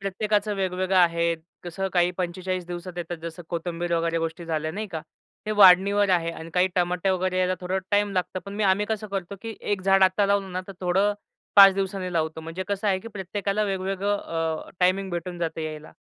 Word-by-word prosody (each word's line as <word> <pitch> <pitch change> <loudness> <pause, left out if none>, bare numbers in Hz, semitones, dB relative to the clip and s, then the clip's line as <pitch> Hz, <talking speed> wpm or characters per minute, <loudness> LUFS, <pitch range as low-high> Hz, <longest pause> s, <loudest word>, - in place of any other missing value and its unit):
प्रत्येकाच 205 +2 0
वेगवेगळं 185 -2 -1
आहे. 170 -1 +3 0.3
कसं 190 +2 -3
काही 175 -1 +3
45 185 0 -3
दिवसात 175 +1 -6
येतात. 175 0 -4
जसं 170 +1 -7
कोथिंबीर 170 0 -3
वगैरे 165 0 0
गोष्टी 165 +1 -4
झाल्या 155 -1 -2
नाही 215 +4 -4
का. 160 -3 -5 0.5
ते - - -1
वाढणीवर 200 +1 +7
आहे 170 -2 +2
आणि 165 0 -9
काही 180 0 +4
टमाटे 180 +1 +1
वगैरे 185 0 0
यायला 185 0 +2
थोडा 185 +1 -1
टाईम 205 0 +2
लागतं, 185 0 -1
पण 200 - -7
मी 210 0 0
आम्ही 195 +2 +2
कसं 215 -1 -3
करतो 195 -1 -4
की 225 -1 -5
1 205 -2 -1
झाड 195 0 +4
आता 190 +2 +4
लावलं 195 -2 0
ना, 185 - -2
तर - - -6
थोडं 190 +3 +2 0.4
5 195 -1 +10
दिवसांनी 190 -2 -3
लावतो 160 -1 -1
म्हणजे 165 +4 -5
कसं 200 +1 -2
आहे 190 -1 +2
की 230 - -9
प्रत्येकाला 200 0 -2
वेगवेगळं 195 +1 -1 0.5
अ, - - -13
टायमिंग 190 +2 +2
भेटून 175 0 -4
जातं 165 -1 -3
यायला. 155 -1 -6
185 Hz, 200 wpm, -25 LUFS, 175-195 Hz, 0.5 s, 5